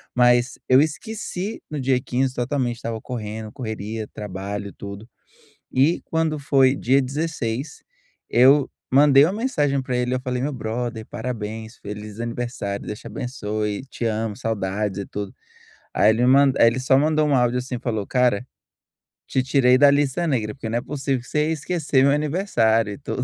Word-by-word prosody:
Mas 120 0 +3
eu 130 +2 +6
esqueci 205 +4 -4
no 150 -2 -4
dia 130 -1 +2
15 130 +1 -1
totalmente. 125 -1 -1
Estava 115 -2 -4
correndo, 110 -3 -6
correria, 110 -3 -5
trabalho, 100 0 -6
tudo. 100 +2 -9 0.6
E 140 +7 +2
quando 160 -2 0
foi 135 -2 +3
dia 135 +1 +2
16, 140 -2 -3 0.5
eu 135 +3 +5 0.2
mandei 140 +1 +6
uma 175 - +1
mensagem 150 - 0
para 125 -1 -2
ele, 125 +1 0
eu 130 - -1
falei: 125 -1 -3
"Meu 145 +1 -1
brother, 115 0 -4
parabéns. 110 -1 -5
Feliz 105 +1 -8
aniversário. 115 -4 -4
Deus 105 - -5
te - - -14
abençoe, 105 -3 -3
te 120 - -5
amo, 110 -1 -2
saudades 105 -3 -2
e 100 - -5
tudo." 100 -1 -6 0.6
Aí 105 - +4
ele 115 +2 0
me 125 - +4
man 135 0 +5
aí 115 - +7
ele 120 +3 +1
só 130 +1 +3
mandou 155 +1 +2
um 140 - +3
áudio 125 0 +2
assim 125 0 -5
e - - -5
falou: 110 -5 -2
"Cara, 125 -2 +1 0.8
te 130 - +1
tirei 130 -1 +4
da 145 +1 +7
lista 145 +4 +1
negra 110 -7 -1
porque 115 -5 -6
não 115 - 0
é - - -1
possível 135 -2 -2
que 120 - -16
você 150 0 0
ia - - 0
esquecer 150 -3 0
meu 140 - +5
aniversário 140 - +1
e - - -8
tudo." 130 -2 -3
125 Hz, 180 wpm, -23 LUFS, 110-140 Hz, 0.8 s, aí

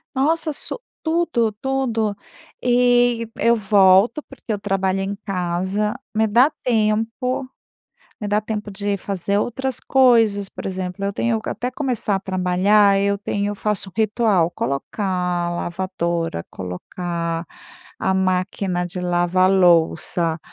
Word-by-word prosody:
Nossa 315 +4 +1
so 300 - -1 0.2
tudo, 320 -9 +1
tudo, 235 -6 -1 0.5
e, 245 -1 +3
eu 235 +1 +3
volto 200 +4 +4
porque 265 -4 -9
eu 210 - -1
trabalho 195 -1 0
em 195 +1 -3
casa, 190 +3 -1 0.2
me 220 0 +3
dá 245 +8 +4
tempo, 230 +3 0 0.7
me 210 - -3
dá 205 +1 +2
tempo 215 -1 -5
de 200 0 -2
fazer 200 +1 -2
outras 255 +4 -2
coisas. 225 -6 +3
Por - - -9
exemplo, 185 0 -4
eu 200 - -1
tenho 230 +1 0
que, - - -8
até 250 - -3
começar 255 -6 -1
a 195 - -1
trabalhar, 190 +2 +3
eu 200 0 +1
tenho 200 0 -2
eu - - -4
faço 210 -1 -1
um - - -14
ritual: 215 -5 +2
colocar 140 - -3 0.4
a - - -2
lavadora, 170 - -3
colocar 170 - -4 0.5
a 190 - 0
máquina 185 -1 0
de 180 +1 -6
lavar 180 +1 +2
louça. 170 -2 +3
200 Hz, 135 wpm, -21 LUFS, 185-230 Hz, 0.7 s, volto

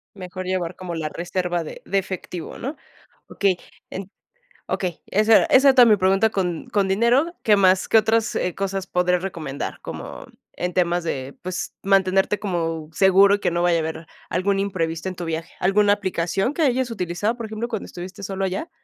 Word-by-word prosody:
Mejor 185 -1 -7
llevar, 185 -2 -2
como 180 -2 -5
la 155 -2 -3
reserva 175 +1 -2
de - - -9
de 195 - 0
efectivo, 185 -3 -5
¿no? 275 +5 -5 0.5
Okey, 195 -3 +1 0.3
en 195 +1 -7 0.6
Okey, 180 -3 -3
esa 215 +2 +5
era - - +3
esa 270 0 +5
tam 245 -3 +8
mi 210 - +6
pregunta 195 +3 +3
con 180 -5 -2
con 200 -2 +1
dinero. 240 - +2
¿Qué 210 - +5
más? 185 -1 +4
¿Qué - - +6
otras, 225 +2 +2
eh, 180 - -1
cosas 195 -1 -3
podrías 180 0 +1
recomendar? 155 -7 -5
Como, - - -8 0.3
en 180 0 -3
temas 175 -1 +1
de 135 -4 -4
Pues, 185 0 -4
mantenerte 195 +1 +2
como 165 -5 -2
seguro, 195 +3 +5
y - - -5
que 175 - 0
no 170 0 0
vaya 175 -1 +3
a - - 0
haber 160 +1 -5 0.2
algún 195 +2 0
imprevisto 185 -3 -2
en 185 - -7
tu 175 - -5
viaje. 165 0 -4
¿Alguna 205 +2 +4
aplicación 195 - -1
que 330 - -2
hayas 260 -3 +1
utilizado, 200 +2 -2
por 235 - -5
ejemplo, 220 +2 -4
cuando 225 -4 -4
estuviste 185 +3 -9
solo 195 0 -2
allá? 190 - -3
190 Hz, 190 wpm, -22 LUFS, 175-205 Hz, 0.6 s, tam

